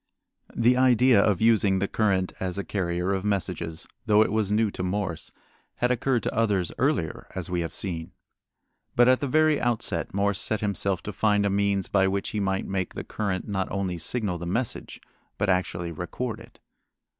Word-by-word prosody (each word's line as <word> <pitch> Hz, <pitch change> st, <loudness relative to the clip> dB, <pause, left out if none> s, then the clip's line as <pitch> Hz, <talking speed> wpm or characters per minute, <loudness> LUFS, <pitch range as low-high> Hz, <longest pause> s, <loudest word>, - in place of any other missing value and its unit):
The 120 Hz, +2 st, +3 dB
idea 125 Hz, -4 st, +5 dB
of 105 Hz, -2 st, +1 dB
using 110 Hz, -4 st, +4 dB
the 100 Hz, +1 st, 0 dB
current 95 Hz, -4 st, 0 dB
as 95 Hz, 0 st, -3 dB
a 100 Hz, -, -2 dB
carrier 90 Hz, -1 st, -1 dB
of 95 Hz, -1 st, -2 dB
messages, 95 Hz, -5 st, -2 dB, 0.2 s
though 105 Hz, 0 st, +6 dB
it -, -, -3 dB
was 110 Hz, -2 st, 0 dB
new 105 Hz, 0 st, +2 dB
to -, -, -6 dB
Morse, 90 Hz, -3 st, -3 dB, 0.4 s
had 125 Hz, +1 st, +1 dB
occurred 125 Hz, -1 st, +1 dB
to -, -, -2 dB
others 100 Hz, -6 st, +1 dB
earlier, -, -, 0 dB
as 95 Hz, -1 st, -4 dB
we 90 Hz, -1 st, 0 dB
have 85 Hz, -2 st, -5 dB
seen. 85 Hz, -2 st, -4 dB, 0.8 s
But 120 Hz, 0 st, +5 dB
at 130 Hz, 0 st, +5 dB
the 140 Hz, -, -2 dB
very 155 Hz, +1 st, +3 dB
outset 115 Hz, -8 st, -1 dB
Morse 100 Hz, 0 st, 0 dB
set 110 Hz, -2 st, 0 dB
himself 100 Hz, -3 st, 0 dB
to 105 Hz, -, -5 dB
find 105 Hz, 0 st, +2 dB
a 100 Hz, -, +1 dB
means 100 Hz, -1 st, +1 dB
by 95 Hz, -1 st, +3 dB
which 100 Hz, +1 st, -1 dB
he 105 Hz, -, -3 dB
might 95 Hz, -1 st, -1 dB
make 95 Hz, -2 st, -3 dB
the -, -, -4 dB
current 100 Hz, -4 st, -3 dB
not 95 Hz, -2 st, -2 dB
only 95 Hz, -3 st, -2 dB
signal 95 Hz, 0 st, -1 dB
the 85 Hz, -, -5 dB
message, 115 Hz, +7 st, -3 dB, 0.4 s
but 105 Hz, -2 st, +1 dB
actually 90 Hz, -2 st, -1 dB
record 110 Hz, +8 st, -4 dB
it. 115 Hz, +1 st, -16 dB
100 Hz, 190 wpm, -26 LUFS, 95-110 Hz, 0.8 s, though